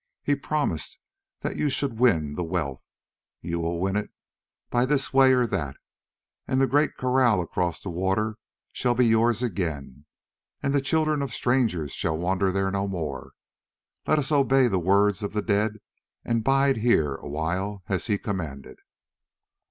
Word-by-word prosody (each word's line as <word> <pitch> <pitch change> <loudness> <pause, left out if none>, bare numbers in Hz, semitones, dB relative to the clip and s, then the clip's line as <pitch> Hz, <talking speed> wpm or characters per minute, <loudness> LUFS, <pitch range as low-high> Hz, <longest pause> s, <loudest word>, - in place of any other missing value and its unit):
He 145 - +2
promised 140 - -2 0.4
that - - -3
you 150 - +1
should 130 -4 -2
win 80 -13 +3
the 90 - -3
wealth: 80 -6 -3 0.6
you 85 0 -3
will 85 0 -2
win 95 +2 0
it 105 - -1 0.6
by 120 0 +3
this 135 0 0
way 135 -1 +6
or 125 -1 +3
that, 75 - -3 0.7
and 130 - +1
the 135 - +5
great 145 +3 +2
kraal 125 -5 +2
across 85 0 -2
the 95 - -6
water 95 +5 -1 0.3
shall 120 -1 0
be 125 0 +4
yours 115 +1 +3
again, 80 - -4 0.6
and 140 - 0
the 140 - +3
children 155 +1 +1
of 135 -4 -3
strangers 115 - 0
shall 80 - -2
wander 95 +3 0
there 95 0 0
no 100 0 -1
more. 80 -8 -5 0.7
Let 155 - +3
us 150 0 -1
obey 135 -2 +4
the 95 -5 +1
words 100 +3 +2
of 100 - -4
the 105 -1 -1
dead 105 +1 +1 0.5
and 115 -1 0
bide 135 0 +3
here 105 - +2
awhile 85 +8 -3
as 95 +2 -1
he 105 -3 +1
commanded." 80 -11 -5
105 Hz, 160 wpm, -25 LUFS, 85-130 Hz, 0.7 s, way